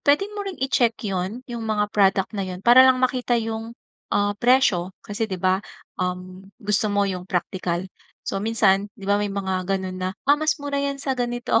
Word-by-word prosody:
puwedeng 315 +9 +2
mo 415 - -5
ring 380 - -5
i-check 245 -3 +2
yun, 195 +5 -3
yung 235 -3 -6
mga 210 -1 0
product 195 -1 +2
na 200 -2 -2
yun, 180 +1 -7
para 240 +2 +8
lang 260 -1 +5
makita 250 -1 +1
yung, 225 +1 -4 0.4
ah, 205 0 +2
presyo. 225 -8 +3
Kasi 220 +2 -3
'di 190 - -3
ba, 185 +1 +2 0.4
um, 185 +1 -4
gusto 210 -1 0
mo 205 0 +2
yung 185 -1 -4
praktikal, 180 0 -2 0.4
so, 195 - -2
minsan 205 -2 +2
'di 195 - -11
ba, 205 +1 +2
may 205 - -1
mga 190 -2 -2
gano'n 190 -1 -2
na, 185 0 -1 0.2
"Ma'am, 295 +1 +5
mas 310 +1 +2
mura 285 -1 -3
'yan 280 0 -1
sa 270 -1 -1
ganito". 240 -1 0
205 Hz, 195 wpm, -23 LUFS, 190-245 Hz, 0.4 s, para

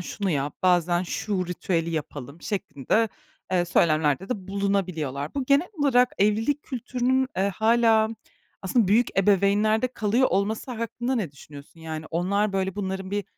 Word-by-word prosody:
"Şunu 195 +2 -3
yap," 145 -2 -1
bazen, 175 -1 +3
"şu 185 0 -2
ritüeli 170 -1 -2
yapalım." 150 -1 -6
şeklinde, 205 - -1 0.4
eee, 180 -1 +3
söylemlerde 155 0 +2
de 195 -6 -4
bulunabiliyorlar. 185 - -2
Bu 275 -2 -1
genel 280 +6 +3
olarak 250 -3 +4
evlilik 225 +8 +1
kültürünün, 255 +1 -1
eee, 195 +1 +2
hâlâ 225 -1 +4 0.5
aslında 200 +1 +2
büyük 220 +1 +2
ebeveynlerde 205 +4 +3
kalıyor 235 +1 +1
olması 210 +6 -1
hakkında 240 +2 -3
ne 210 - -2
düşünüyorsun? 145 +3 -14
Yani, 160 -1 -6
onlar, 195 +5 0
böyle, 190 -1 -1
bunların 190 -1 -4
bir 205 -1 -2
200 Hz, 140 wpm, -25 LUFS, 175-225 Hz, 0.5 s, olarak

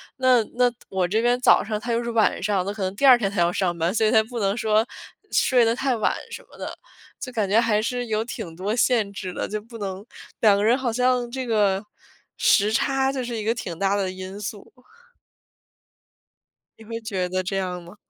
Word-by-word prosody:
那 255 -2 +4
那 245 0 +3 0.2
我 190 -2 0
这 215 +5 0
边 245 +1 +2
早 - - +6
上 215 0 -3
他 235 +3 -4
又 230 +1 +1
是 235 0 -3
晚 225 -2 +2
上， 195 -2 0
那 200 - -2
可 210 - -8
能 190 +1 -2
第 280 - -6
2 255 -2 +9
天 200 -5 -1
他 200 -3 -1
要 170 +1 +3
上 175 -2 -1
班， 170 +3 0
所 220 -1 +2
以 - - +2
他 220 -2 +5
不 235 +1 -6
能 200 0 +1
说 220 +1 +1 0.5
睡 245 -3 +4
得 230 +1 +2
太 265 -1 0
晚 220 - 0 0.2
什 - - -8
么 - - -19
的， - - -6 0.4
就 255 -2 -6
感 210 -5 -1
觉 215 +3 +4
还 215 -2 +2
是 245 +2 -2
有 220 0 0
挺 215 -8 -7
多 200 +5 -2
限 230 -5 +2
制 185 -3 -6
的， - - -3
就 215 0 -3
不 230 +1 -12
能 195 +1 -5 0.4
两 210 -3 +6
个 200 - 0
人 235 +4 +4
好 255 -3 -1
像 250 0 +1
这 260 -1 -4
个 205 -3 +2 0.5
时 210 +1 +3
差 270 +3 +1
就 260 -2 -3
是 240 -1 -4
一 215 - -4
个 225 +2 +1
挺 175 -7 -6
大 200 0 +1
的 190 -2 -1
因 185 +2 -8
素。 205 0 -7 2.1
你 225 - -13
会 230 +1 -5
觉 190 -5 -2
得 185 0 -1
这 195 +2 -3
样 180 -2 -3
吗？ 175 +4 -13
215 Hz, 240 characters per minute, -23 LUFS, 195-240 Hz, 2.1 s, 2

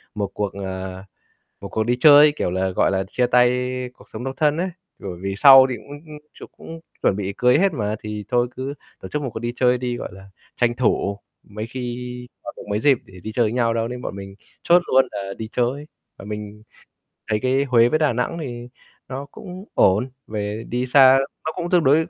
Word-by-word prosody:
một 100 -2 -3
cuộc, 100 -2 -3
à, 95 -1 -6 0.6
một - - -7
cuộc 110 - -1
đi 120 +2 +1
chơi 150 0 +8
kiểu - - -1
là, 95 +1 -1
gọi 90 - +2
là, 95 0 0
chia 125 -1 +1
tay 125 0 +4 0.4
cuộc - - -19
sống 110 +2 -6
độc 135 0 -4
thân" 150 0 +2
ấy. 180 +3 -1 0.3
Bởi 95 -3 -7
vì 95 0 -3
sau 135 0 +9
thì 125 - -2
cũng 145 +7 -11
cũng 150 -1 -10 0.2
ch - - -14
cũng 165 0 -10 0.2
chuẩn 95 - +2
bị 100 -1 -3
cưới 125 +2 +4
hết 195 +1 +3
mà, 105 -6 -2
thì 105 -1 -5
thôi 120 -1 +2
cứ 135 +2 -4 0.3
tổ - - -8
chức 150 - -3
một 135 - -3
cuộc 110 - -4
đi 120 0 -3
chơi 125 -1 +3
đi, 125 -1 -3
gọi - - -5
là, 95 +1 -14 0.3
tranh 120 -1 +2
thủ 100 -4 0 0.2
mấy 105 +2 -7
khi 120 0 -5 0.5
còn 120 - -8
được - - -9
mấy 105 - 0
dịp 135 -1 +4
để - - -18
đi 110 - -6
chơi 120 - +3
với 110 - -1
nhau 115 -2 +1
đâu 115 0 -1
nên 125 0 -6
bọn - - -5
mình 95 0 -9 0.3
chốt 175 +1 +5
luôn 130 +1 +3
là 100 -1 -5
đi 110 -1 -5
chơi. 130 +4 -1 0.3
Mà - - -10
mình 105 0 -7 0.7
thấy 105 - +2
cái 130 +2 +2
Huế 120 -3 +4
với 155 - +1
Đà 150 -5 +2
Nẵng 125 +8 -2
thì 120 -4 -6 0.4
nó 135 +2 -6
cũng 185 +5 -10
ổn, 105 +8 +3 0.2
về 105 +1 -4
đi 125 +1 -2
xa 130 0 +7 0.3
nó 160 - -2
cũng 175 -1 -5
tương 175 -4 +3
đối 155 +5 +4
120 Hz, 230 wpm, -22 LUFS, 105-135 Hz, 0.7 s, sau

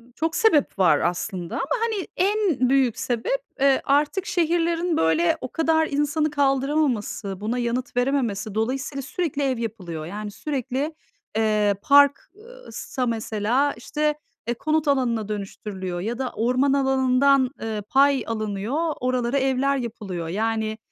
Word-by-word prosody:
çok 325 +1 -1
sebep 310 - +3
var 180 -3 +5
aslında 180 0 -2
ama - - -1 0.2
hani 440 -5 -1
en 370 - +2
büyük 265 -3 +2
sebep, 260 - -1 0.2
eee, 275 -1 +4
artık 295 +7 +1
şehirlerin, 340 -1 +1
böyle, 160 +1 +2
o 255 - -6
kadar 320 -1 +2
insanı 295 +2 0
kaldıramaması, 270 -8 0
buna 225 +4 -1
yanıt 245 +1 -2
verememesi. 240 -6 0
Dolayısıyla 265 +5 -2
sürekli 290 +1 -2
ev 265 -2 0
yapılıyor. 185 -9 -5
Yani, 210 +4 -6
sürekli, 275 +4 -3 0.4
eee, 210 -2 +2
park, 285 +3 +5
ııı, - - -14
sa 255 -1 -3
mesela, 230 +4 0
işte, 300 +5 -1 0.3
eee, 240 - +1
konut 310 +5 0
alanına 240 -6 +1
dönüştürülüyor 195 -3 -5
ya 230 +5 -3
da 260 -1 -3
orman 255 +4 +2
alanından, 265 0 +3
ııı, 215 -2 -3
pay 275 -2 +4
alınıyor, 225 +9 -2
oralara 250 0 0
evler 270 +1 +1
yapılıyor. 205 -8 -5
Yani, 220 +3 -1
255 Hz, 135 wpm, -24 LUFS, 220-290 Hz, 0.4 s, var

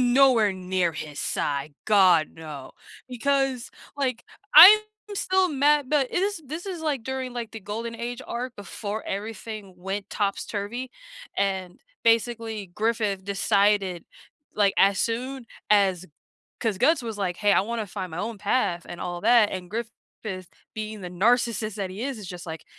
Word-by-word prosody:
I'm 245 - +2
nowhere 245 -7 +5
near 185 -2 -1
his 150 -1 -7
side. 140 +1 -2
God 185 -6 +5
no! 150 -4 -9 0.4
Because, 265 0 0 0.3
like, 255 -4 -2 0.3
I'm 380 +7 +12 0.3
still 375 -1 +2
mad 290 0 +3
but 290 -3 +2
it 360 - 0
is 400 -3 -1
this 320 +7 -6
is 365 -4 -5
like 285 -7 -1
during, 260 -1 -4
like, 235 -2 -5
the 225 - -7
Golden 225 +4 -5
Age 240 +2 -5
arc 245 +1 -4
before 205 +1 -6
everything 210 -1 -6
went 195 +2 -5
top's-turvy, 205 +4 -3 0.5
and 190 -2 -2 0.2
basically 230 -2 +1
Griffith 215 -4 0
decided, 200 -2 +1 0.5
like, 200 -2 +3
as 195 0 +4
soon 250 +2 -2 0.2
as 190 -3 +3 0.5
'cause 220 -5 -1
Guts 310 - +3
was 225 -3 -5
like, 180 -3 -1
"Hey, 205 0 +3
I - - +5
wanna 225 +1 -3
find 185 -2 -6
my 160 - -6
own 220 +1 -4
path 195 -4 0
and 175 - -8
all 175 0 -4
that," 230 -1 +5
and 180 -2 -6
Griffith 230 +1 -4 0.8
being 215 -1 -5
the 180 -2 -7
narcissist 220 +2 +1
that 195 -2 -3
he 200 +5 -6
is, 275 -2 -3
is 200 - -8
just 180 -1 -8
like, 160 0 -7
215 Hz, 160 wpm, -25 LUFS, 190-245 Hz, 0.8 s, I'm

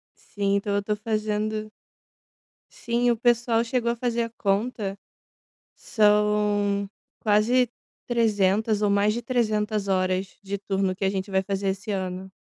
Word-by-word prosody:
Sim, 200 -1 -1
tô 200 0 -1
tô 210 +1 -1
fazendo 215 0 -2 1.0
Sim, 240 +1 0
o 235 - +2
pessoal 235 -1 +2
chegou 235 -1 0
a 235 - -1
fazer 235 -1 -1
a 230 - -4
conta. 200 -1 -1 0.8
São 210 -1 +2 0.3
quase 225 +4 +3 0.4
300 215 -2 +2
ou 210 - +2
mais 205 +1 +3
de 235 - -3
300 215 -4 0
horas 185 0 0
de 200 0 -4
turno 195 -1 -1
que 195 - -5
a 190 - +3
gente 195 0 -3
vai 190 0 +1
fazer 195 0 -2
esse 195 +3 -2
ano. 190 -1 -4
210 Hz, 140 wpm, -25 LUFS, 195-225 Hz, 1.0 s, quase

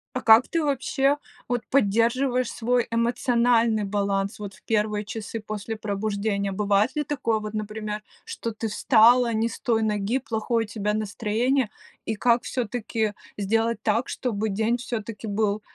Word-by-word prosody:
А 255 - -1
как 225 +2 +7
ты, 330 -1 0
вообще 275 0 +1 0.3
вот, 245 -1 -1
поддерживаешь 250 +2 +2
свой 245 +1 0
эмоциональный 235 -1 +2
баланс, 200 0 -1
вот, 205 -2 -6
в - - -20
первые 210 -1 0
часы 220 +1 -6
после 215 +1 -5
пробуждения? 200 -1 -2
Бывает 205 +4 +1
ли 300 - 0
такое, 250 -6 -1
вот, 215 0 -6
например, 215 0 -4 0.2
что 455 - -5
ты 220 0 -3
встала 235 +3 +5
не 225 +1 +1
с - - -8
той 225 -2 +1
ноги, 210 +4 0
плохое 230 -1 -1
у - - -15
тебя 210 -1 -1
настроение, 215 +4 0 0.4
и 220 - -1
как 235 +2 +2
всё-таки 225 -3 -2 0.2
сделать 225 +2 0
так, 230 +4 +1
чтобы 220 -3 -2
день 220 +4 0
всё-таки 230 -2 -5
был 210 0 0
220 Hz, 150 wpm, -25 LUFS, 210-240 Hz, 0.4 s, как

